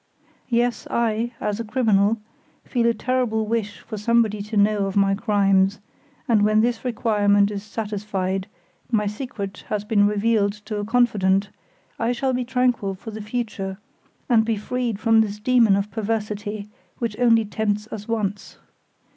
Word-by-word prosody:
Yes, 240 0 0
I, 230 0 0
a 210 +2 -2
criminal, 220 -2 +2 0.5
feel 235 -2 +1
a 235 - +3
terrible 235 -2 0
wish 215 -2 -2
for 220 - -7
somebody 220 -1 +2
to 210 +1 -4
know 205 -1 +3
of 195 - -5
my 195 -1 +3
crimes, 195 -2 +2 0.5
and 225 -4 +4
when 215 +1 +4
this 235 0 0
requirement 205 -4 +2
is 200 -1 -4
satisfied, 200 -3 -3 0.4
my 210 -3 +2
secret 210 -2 -5
has 210 -1 -2
been 205 -2 +3
revealed 210 0 +1
to 210 +1 -6
a 205 - -3
confidant, 205 -4 +2 0.5
I 230 +2 +1
shall 260 +2 -1
be 250 0 0
tranquil 245 -5 0
for 220 +4 -9
the 215 0 -7
future, 210 -4 -4 0.5
and 230 -4 +4
be 225 0 0
freed 235 0 -2
from 225 0 +4
this 210 -1 -2
demon 230 -2 +4
of 200 +1 -2
perversity, 210 -1 -3 0.3
which 230 -3 -2
only 230 -2 +4
tempts 210 0 -2
us 210 -1 -7
once. 205 -3 -3
215 Hz, 155 wpm, -23 LUFS, 205-230 Hz, 0.5 s, and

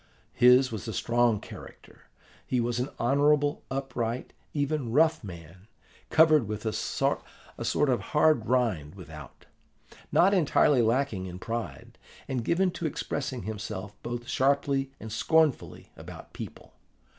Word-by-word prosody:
His 125 +1 +5
was 110 -2 -6
a 110 - -4
strong 120 +1 +2
character: - - -13 0.4
he 125 - 0
was 120 0 -1
an 125 +3 -2
honourable, 145 +3 +2
upright, 125 -3 -3 0.2
even 145 -4 -1
rough 160 +3 +3
man, 85 0 -11 0.4
covered 155 -6 +5
with 105 +1 -5
a 110 - -1
sort - - -1 0.4
of 135 -5 +1
hard 150 +1 +2
rind 110 - 0
without, - - -12 0.7
not 190 +4 +4
entirely 150 -6 +3
lacking 115 -4 0
in 90 0 -7
pride, 115 - -6 0.3
and 130 -3 -2
given 180 +7 +1
to 170 - -3
expressing 135 -4 -4
himself 105 -1 -6
both 120 0 -5
sharply 135 0 +1
and 110 - -8
scornfully 155 +6 +1
about - - -11
people. - - -9
125 Hz, 130 wpm, -28 LUFS, 110-145 Hz, 0.7 s, His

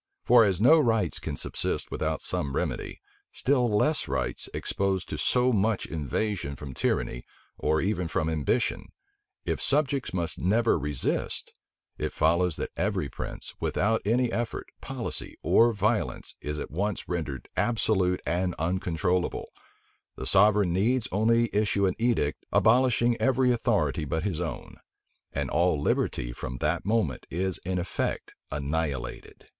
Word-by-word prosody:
For 120 -1 +7
as 95 -4 +1
no 155 +9 +7
rights 115 - +1
can 75 - -4
subsist - - -3
without - - -2
some 70 -2 -2
remedy, - - -3 0.3
still 125 -3 +1
less 130 +9 +2
rights - - -2
exposed 95 -2 -1
to - - -3
so 125 0 +2
much 105 0 +1
invasion 80 - -2
from 70 -2 -8
tyranny, - - -1 0.4
or 80 +1 +2
even 90 -2 0
from 80 -1 -1
ambition; 80 - 0 0.5
if - - -1
subjects 140 -2 +1
must 85 -3 -3
never 110 +2 +2
resist, 75 -2 -2 0.5
it - - -1
follows 85 +1 +2
that - - -4
every 70 - -1
prince, - - -7
without 110 +4 +1
any 120 +3 +2
effort, 115 0 -3
policy, - - -4
or 120 +1 +5
violence, 100 -4 -1
is 75 0 -4
at - - -5
once 100 +6 -2
rendered 80 -7 -3
absolute 95 -6 +1
and 90 +1 0
uncontrollable; 90 +2 -1 0.7
the - - -6
sovereign 100 -2 +4
needs 115 +6 +2
only 115 +4 +3
issue 100 -1 +2
an 95 - +2
edict 115 -11 +1
abolishing 120 0 +4
every 130 -1 +3
authority 100 - +1
but 80 +3 -2
his 95 -5 -2
own; 85 - -5 0.5
and - - -2
all 85 -1 +2
liberty - - 0
from 65 +1 -6
that 80 +7 -1
moment 105 - 0
is 95 +2 -2
in 90 +1 -3
effect 90 +1 -2 0.2
annihilated. 70 -2 -3
95 Hz, 140 wpm, -27 LUFS, 80-115 Hz, 0.7 s, For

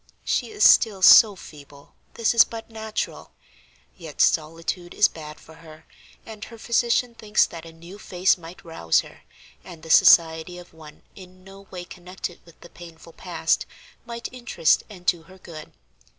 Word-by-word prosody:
She - - -1
is 420 -1 +4
still 200 -5 +3
so 210 0 +8
feeble 145 -4 -16 0.2
this 230 0 0
is 230 - +7
but 230 0 -10
natural; 220 -1 -6 0.6
yet 160 -5 -12
solitude 165 +3 -1
is 210 - +4
bad 150 -1 -12
for 160 - -17
her, 160 -1 -16 0.4
and 215 -1 -11
her 230 - -13
physician 235 +1 0
thinks 215 -2 +1
that 165 -1 -11
a - - -12
new 170 +5 -14
face 185 -1 0
might 175 0 -14
rouse 85 - 0
her, - - -17 0.4
and 165 -3 -13
the 160 - -6
society 160 +2 +4
of 175 -1 -14
one 155 -2 -16
in 185 -1 -16
no 195 +1 -15
way 180 -1 -9
connected 180 0 -9
with 170 - -20
the 170 - -14
painful 165 -1 -14
past - - -2 0.4
might 235 -1 -7
interest 240 -10 0
and 185 -4 -14
do 175 -2 +1
her 190 +3 -18
good. 165 -4 -12
175 Hz, 165 wpm, -23 LUFS, 160-210 Hz, 0.6 s, so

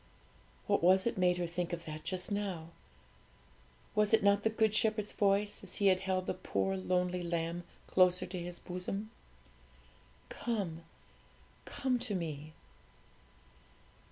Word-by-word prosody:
"' - - -29
What 200 - +2
was 185 +2 +5
it 235 - 0
made 180 -1 +3
her 175 - -1
think 175 +1 -3
of 170 -1 -4
that 155 0 -6
just 185 +1 -2
now? 190 -6 -2 1.2
Was 210 +1 +5
it 220 - -1
not 200 0 +5
the 220 - +2
Good 220 -1 +2
Shepherd's 215 -1 +1
voice, 205 0 +1
as 195 - -4
He 200 - 0
held 185 -1 +2
the - - -1
poor 195 0 -1
lonely 180 -1 0
lamb 170 0 -2 0.2
closer 180 0 +4
to 180 0 -5
His 175 0 -5
bosom? 195 +4 -5 1.2
'Come, 185 -8 -3 0.8
come 255 -2 0
to 235 -4 -2
Me.' 155 -3 -4
185 Hz, 140 wpm, -33 LUFS, 175-205 Hz, 1.2 s, was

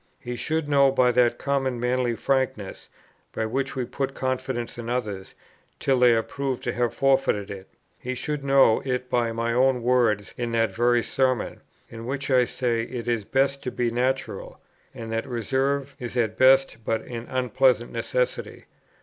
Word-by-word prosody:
he 120 0 -5
should 160 +4 -2
know 140 -2 +4
by 125 -2 +3
that 120 -1 +3
common 135 -3 -1
manly 125 0 0
frankness, 130 -6 -2 0.4
by 110 - -1
which 130 +4 -2
we 130 -2 -1
put 135 +2 -3
confidence 130 -2 -3
in 115 0 -5
others, 105 -6 -3 0.4
till 135 -2 +2
they 125 -1 +6
are 115 - +1
proved 135 -1 -4
to - - -2
have 120 -2 0
forfeited 135 -6 +1
it; 95 -1 -8 0.3
he 130 +1 -4
should 150 +2 -3
know 135 -5 +4
it 125 -1 -3
by 120 -2 +1
my 115 +1 -1
own 125 0 +2
words 120 -5 +2
in 120 -1 -2
that 115 -1 +2
very 120 0 +2
Sermon, 130 -3 -1 0.3
in 115 0 -9
which 140 +1 -3
I 125 -1 +5
say 120 -2 -1
it 120 0 -6
is 115 -4 0
best 135 +2 +1
to - - -3
be 120 -1 -1
natural, 130 +3 -2 0.3
and 115 -1 -8
that 115 +4 -2
reserve 135 +3 -1
is 125 -1 -5
at 110 -3 +1
best 135 -1 +5
but 110 +1 -1
an 120 -1 -7
unpleasant 125 -1 +2
necessity. - - -2
125 Hz, 175 wpm, -25 LUFS, 115-135 Hz, 0.4 s, they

